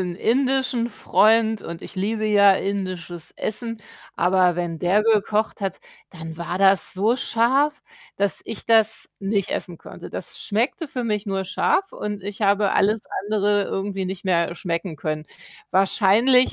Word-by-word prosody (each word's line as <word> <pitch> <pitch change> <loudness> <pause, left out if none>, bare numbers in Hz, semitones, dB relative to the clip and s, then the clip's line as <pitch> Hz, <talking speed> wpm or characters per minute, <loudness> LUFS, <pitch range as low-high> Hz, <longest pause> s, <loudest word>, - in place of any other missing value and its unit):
'n 180 -2 -3
indischen 260 +1 +1
Freund, 220 0 +2
und 170 0 -7
ich - - -11
liebe 215 +3 -1
ja 200 -2 +6
indisches 185 -4 -4
Essen, 230 0 -4 0.3
aber 180 0 +3
wenn 170 -1 -3
der 185 +5 +2
gekocht 215 0 +1
hat, 195 -2 -3 0.3
dann 160 -2 -8
war 175 +2 -4
das 195 -1 +3
so 215 +6 +2
scharf, 265 +6 +1 0.3
dass 200 0 0
ich 225 - -7
das 220 -1 +2
nicht 195 -1 -1
essen 175 -3 -4
konnte. - - -11
Das - - -7
schmeckte 240 - -1
für 255 -3 -4
mich 210 -2 -2
nur 195 -1 -2
scharf, 385 - 0
und 205 -1 -5
ich 200 +1 -7
habe 200 -1 +2
alles 215 +2 +2 0.3
andere 205 -1 +1
irgendwie 195 0 -3
nicht 185 0 -6
mehr 170 -2 +1
schmecken 170 0 -3
können. 155 +1 -4 0.5
Wahrscheinlich 210 +7 +4
200 Hz, 155 wpm, -23 LUFS, 185-225 Hz, 0.5 s, ja